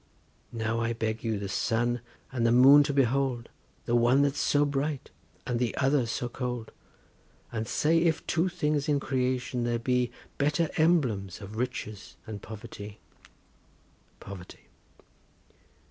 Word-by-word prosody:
Now 115 0 -1
I 115 0 0
beg 110 -1 -3
you 110 -2 0
the 100 0 -4
sun 120 +4 0 0.3
and 125 -3 -1
the 115 - +4
moon 135 +4 +8
to 145 - 0
behold, 135 -2 +1 0.4
The 120 - +1
one 120 +4 +4
that's 140 0 0
so 145 0 +3
bright, 145 0 -2 0.3
and 120 -2 -1
the 120 -2 -1
other 135 -2 +2
so 120 +1 -2
cold, 125 -2 -4 0.8
And 110 -1 -3
say 165 +2 +2
if 165 -1 +1
two 175 +2 +1
things 150 -2 -1
in 145 -1 +3
creation 125 -2 -1
there 120 0 0
be 125 +1 +1 0.3
Better 150 +3 +1
emblems 125 - +1
of 105 +1 -9
Riches 110 -3 -5
and 105 -2 -7
Poverty. 110 -2 -9 1.2
POVERTY. 95 -2 -11
125 Hz, 140 wpm, -28 LUFS, 115-140 Hz, 1.2 s, moon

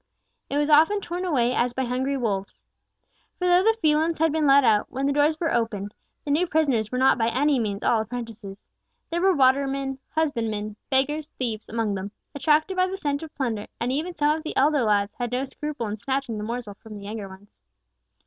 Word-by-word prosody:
It 280 - -1
was 295 0 +2
often 320 +8 +5
torn 360 -1 -4
away 250 -8 +1
as 240 0 +1
by 265 - 0
hungry 260 +3 -1
wolves. 200 -6 -3 0.7
For 360 - -2
though 355 0 +5
the 450 +3 +3
felons 315 +2 +2
had 320 0 +2
been 310 -1 +1
let 275 0 +6
out, 215 -4 +3
when 270 +2 -2
the 280 - +2
doors 295 +2 +2
were 330 -2 0
opened; 215 -3 -1 0.3
the 290 - -2
new 335 +5 +2
prisoners 275 -10 +1
were 250 - -2
not 260 -1 +4
by 225 - +2
any 270 +4 +2
means 205 -3 -3
all 225 - +3
apprentices. 225 -4 -7 0.5
There 340 +1 -1
were 380 0 +4
watermen, 270 0 +2
husbandmen, 225 -9 -2
beggars, 295 +3 0
thieves, 225 -4 -3
among 225 -2 -1
them, 195 +1 -5 0.2
attracted 310 +5 +2
by 370 0 +2
the 380 +1 -4
scent 285 -5 -2
of 320 -2 -10
plunder; 225 -6 -2
and 240 +2 -1
even 325 +6 -2
some 300 0 +2
of 320 - -5
the 310 - -6
elder 290 +1 +3
lads 205 -2 +1
had 245 -1 -2
no 255 +2 -1
scruple 295 -2 -5
in 210 0 -4
snatching 265 -3 -2
the - - -4
morsel 230 -1 -4
from 215 +1 -12
the 200 - -10
younger 210 -1 -6
ones. 190 +2 -15
265 Hz, 210 wpm, -25 LUFS, 225-300 Hz, 0.7 s, let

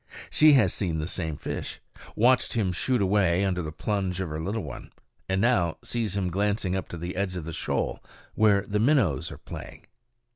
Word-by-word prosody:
She 155 -1 +6
has 110 -10 +4
seen 85 -5 -1
the 75 - -2
same 80 -3 -3
fish, - - -5 0.4
watched 125 +3 +3
him 105 -6 +1
shoot 120 +5 0
away 95 -1 +3
under 90 -2 0
the 80 -2 -5
plunge 95 +2 -2
of 95 -3 -2
her 75 +1 -4
little 100 +5 -2
one, 75 -5 -8 0.4
and 95 0 +1
now 95 -8 +2
sees 110 -5 -2
him 90 -2 -1
glancing 100 0 0
up 95 - -3
to 85 - -6
the 85 +2 -5
edge 95 -1 -1
of 85 -4 -5
the 80 - -5
shoal - - -2 0.3
where 105 -2 +4
the 105 0 -1
minnows 110 - +2
are - - -8
playing. - - -10
95 Hz, 195 wpm, -27 LUFS, 85-105 Hz, 0.4 s, She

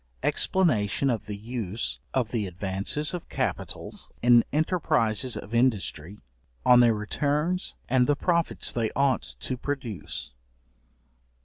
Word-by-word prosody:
Explanation 135 - +2
of 115 -4 -3
the 105 -1 -4
use 105 - -3
of 125 -4 0
the 110 -5 -1
advances 95 - -2
of 175 - -6
capitals - - -4
in 120 -1 +7
enterprises 145 - +1
of 105 - -8
industry; 105 -7 0 0.5
on 125 -1 +7
their 120 -2 +5
returns 150 +11 -1
and 125 0 +3
the 145 - +3
profits 170 +3 0
they 115 -2 0
ought 140 -2 +1
to 130 - -3
produce. 125 - -4
120 Hz, 120 wpm, -27 LUFS, 105-145 Hz, 0.5 s, in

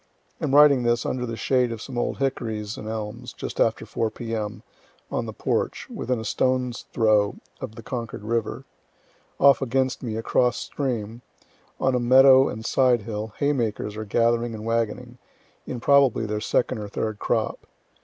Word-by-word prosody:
Am 135 - +1
writing 145 -3 +7
this 120 0 +1
under 125 -1 -2
the 115 -1 -5
shade 125 -1 +1
of 115 - -5
some 130 +3 -8
old 120 - -1
hickories 110 -6 -2
and 105 - -8
elms, 110 -1 -5
just - - -7
after - - +2
4 115 - -1
P.M., 110 -1 -5 0.5
on - - -2
the - - -4
porch, - - -2
within 125 -1 -2
a 110 - -6
stone's 125 -1 0
throw 105 -2 +3 0.2
of 110 - -7
the 115 - -10
Concord 115 -3 -5
river. 115 0 -2 0.7
Off 140 0 +6
against 130 0 0
me, 115 -4 -4
across 120 +1 +1
stream, 120 -4 -3 0.6
on 130 - +2
a 125 - +2
meadow 130 +2 +6
and 110 +1 -7
side 125 -4 +3
hill, 105 0 -5
haymakers 115 -7 -1
are 110 - -4
gathering 115 +2 +1
and 110 0 -8
wagoning 115 +2 -2 0.5
in 125 - -4
probably 135 -3 +4
their 105 0 -3
second 125 +2 0
or 105 - -5
third 110 +1 -3
crop. 110 -3 -1
115 Hz, 165 wpm, -24 LUFS, 110-130 Hz, 0.7 s, writing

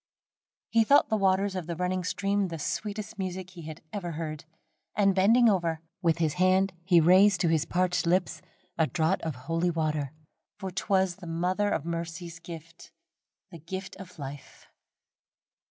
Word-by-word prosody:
He 230 -1 +5
thought 280 +6 +5
the 220 - +2
waters 195 -1 +2
of 180 -3 -4
the 170 - -3
running 180 +1 -1
stream 200 +2 0
the 165 -2 -5
sweetest 210 +6 -4
music 185 0 -4
he 170 -4 -10
had 155 -1 -9
ever 185 -5 -3
beard, 155 0 -5 0.5
and 195 -1 +4
bending 225 +6 +5
over, 170 -6 +1 0.2
with 165 -3 +2
his 160 -3 +1
hand 185 +1 +3
he 175 -1 +5
raised 185 +3 +6
to 170 - +3
his 160 -1 +2
parched 180 -1 0
lips 175 -2 +1 0.4
a 160 - +4
draught 165 +4 0
of 160 -4 -3
holy 165 +7 -1
water 155 -4 -1 0.5
for 190 -2 -5
'twas 190 -1 +1
the 180 -4 -10
Mother 180 +5 0
of 160 - -1
Mercy's 170 0 -5
gift 165 0 -11 0.6
the 170 - -10
gift 190 +5 -6
of 180 -2 -11
life. 140 -1 -9
180 Hz, 165 wpm, -28 LUFS, 165-190 Hz, 0.6 s, raised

